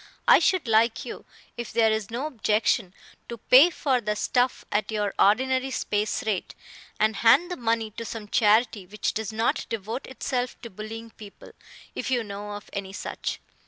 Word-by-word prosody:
I - - +8
should 350 -3 +1
like 225 +1 +2
you, - - -8 0.3
if 240 -2 -5
there 225 -1 +3
is 220 -2 -2
no 240 +5 -3
objection, 215 -6 0 0.3
to 235 - -5
pay 260 +9 +7
for 270 -7 0
the 210 -1 -1
stuff 245 +3 0
at 205 +1 0
your 210 -2 -1
ordinary 260 +5 +3
space 210 -5 -1
rate, 205 -5 -2 0.4
and 215 0 +2
hand 280 - +5
the - - -2
money 225 -3 -1
to 230 +2 -7
some 225 -2 -7
charity 215 -2 +2
which 210 +3 -2
does 220 -1 -3
not 225 +2 -1
devote 225 +4 -4
itself 255 -1 -3
to 235 - -8
bullying 225 +3 -8
people, 210 -2 -13 0.4
if - - -4
you 245 -3 +1
know 205 0 -7
of 205 - -8
any 195 -1 -5
such. - - -5
225 Hz, 175 wpm, -26 LUFS, 210-245 Hz, 0.4 s, I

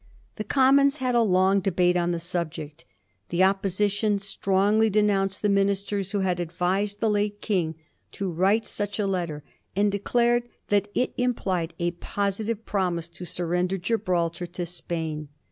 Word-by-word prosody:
The 215 - -2
Commons 275 +4 +4
had 255 -4 -1
a 240 - +4
long 190 -1 +3
debate 180 -1 +2
on 175 -1 +1
the 170 -1 -1
subject. 165 -3 -5 0.4
The 175 +2 +2
Opposition 200 +2 +1
strongly 200 +2 +2
denounced 200 -2 +1
the - - +4
ministers 200 0 +1
who 205 - 0
had 180 -2 0
advised 185 +4 -1
the 225 - +2
late 205 0 0
King 175 -8 -1 0.4
to 195 -2 -3
write 195 +6 +2
such 205 -1 -2
a 210 - 0
letter, 170 -6 -2 0.3
and 205 +1 +3
declared 240 +4 +1 0.2
that 205 0 +2
it 250 - 0
implied 185 -9 -1
a 175 0 0
positive 205 +5 -3
promise 175 -4 -1
to 180 +1 -8
surrender 180 +2 -1
Gibraltar 175 -4 -1
to 175 +1 -5
Spain. 160 -3 -4
195 Hz, 150 wpm, -26 LUFS, 175-210 Hz, 0.4 s, Commons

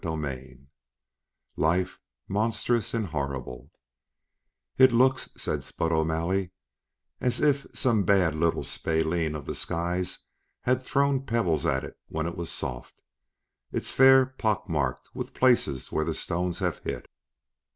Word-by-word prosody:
CHAPTER 80 -4 -2
IV 65 0 -10 1.0
Life 90 +4 +1 0.3
Monstrous 115 +2 0
and 115 -2 0
Horrible 70 -5 -4 1.1
"It 130 -1 +8
looks," 130 +2 +3
said - - -2
Spud 80 - -2
O'Malley, 85 +4 0 0.7
"as 125 - 0
if 145 -2 +2
some 115 -5 +2
bad 95 -4 +3
little 80 +1 +1
spalpeen 80 0 0
of 75 - -6
the - - -3
skies 90 +2 -2 0.4
had 125 +1 +1
thrown 140 +1 +1
pebbles 100 -9 +1
at 65 0 +1
it - - -9
when 80 0 -3
'twas 85 0 -3
soft. - - -5 0.7
It's - - -2
fair 130 0 +7
pockmarked 100 - -2
with - - -6
places 120 - +2
where 80 - +1
the 80 0 -2
stones 90 0 -2
have - - -1
hit." - - -5
85 Hz, 130 wpm, -27 LUFS, 80-115 Hz, 1.1 s, It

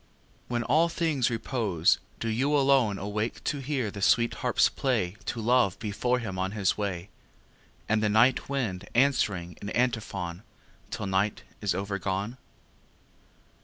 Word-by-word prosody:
When 120 -1 -1
all 155 +8 +3
things 155 -7 +1
repose, 110 - +1 0.2
do 115 - -3
you 135 +7 +2
alone 135 -7 +3
Awake 105 +3 -3
to 145 - -1
hear 135 -5 -2
the 100 - -7
sweet 115 +4 +3
harps - - +3
play 110 -9 -1
To 120 - -3
Love 115 -4 +3
before 115 +3 0
him 105 -6 -4
on 95 +2 -1
his 100 -3 +1
way, 100 -3 -3 0.8
And 110 0 +2
the 105 - +2
night 115 +7 +3
wind 105 -9 -2
answering 100 - +1
in 100 - -5
antiphon 105 -8 -1 0.5
Till - - -4
night 95 +2 0 0.2
is 100 -4 0
overgone? 100 +3 -2
110 Hz, 140 wpm, -28 LUFS, 100-125 Hz, 0.8 s, all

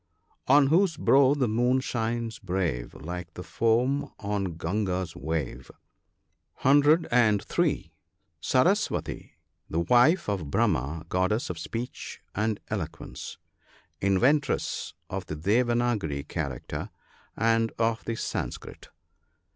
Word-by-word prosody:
" - - -40
On 145 -1 +7
whose 165 +3 +3
brow 140 -2 +5
the 135 -4 +1
Moon 120 +4 +2
shines 115 -2 -2
brave, 85 -10 -2
Like 85 +3 -7
the - - -6
foam 125 +5 +1
on 100 -4 -2
Gunga's 90 -1 -2
wave. 75 -5 -4 0.4
" - - -34
(103.) 135 - +3 0.5
Saraswati. 180 - 0 0.2
— - - -48
The 80 - -1
wife 125 - +4
of 95 -8 -2
Brahma, 70 +4 0
goddess 95 +5 0
of 85 - -7
speech 115 +8 -6
and 110 +1 -1
elo - - -1
quence - - -9 0.3
— - - -32
inventress 140 +10 +1
of 95 -2 -5
the 75 - -4
Devanagari 105 - 0
character 70 -7 -4 0.5
and 115 +1 +2
of 115 0 0
the 115 - -2
Sanskrit. - - -5
110 Hz, 115 wpm, -27 LUFS, 85-125 Hz, 0.5 s, On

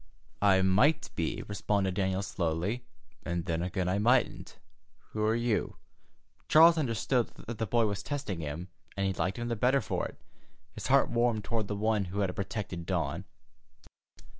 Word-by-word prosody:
"I 95 -2 +5
might 135 - +3
be," 80 -2 -2
responded 100 -2 0
Daniel 95 0 0
slowly, 95 +8 -2 0.3
"and 85 -1 -3
then 80 0 -1
again 90 0 -2
I 95 +2 +1
mightn't. 120 +4 +1 0.5
Who 110 - -2
are 110 +1 +3
you?" 120 -2 0 0.7
Charles 165 +2 +8
understood 120 -2 +1 0.2
that 115 0 -6
the 110 - -1
boy 115 +2 +3
was 100 -2 -2
testing 135 - -4
him, 80 +4 -5 0.3
and 100 - 0
he 95 - +1
liked 95 +1 -2
him 120 0 -3
the 120 - -1
better 125 +5 +3
for 110 - -2
it. - - -15 0.5
His - - -5
heart - - +4
warmed 120 -2 +1
toward 110 +1 -2
the 105 - -2
one 105 -1 +1
who 95 +3 -3
had 95 -2 -1
protected 95 -4 -4
Dawn. 85 -1 -1
100 Hz, 165 wpm, -30 LUFS, 95-115 Hz, 0.7 s, Charles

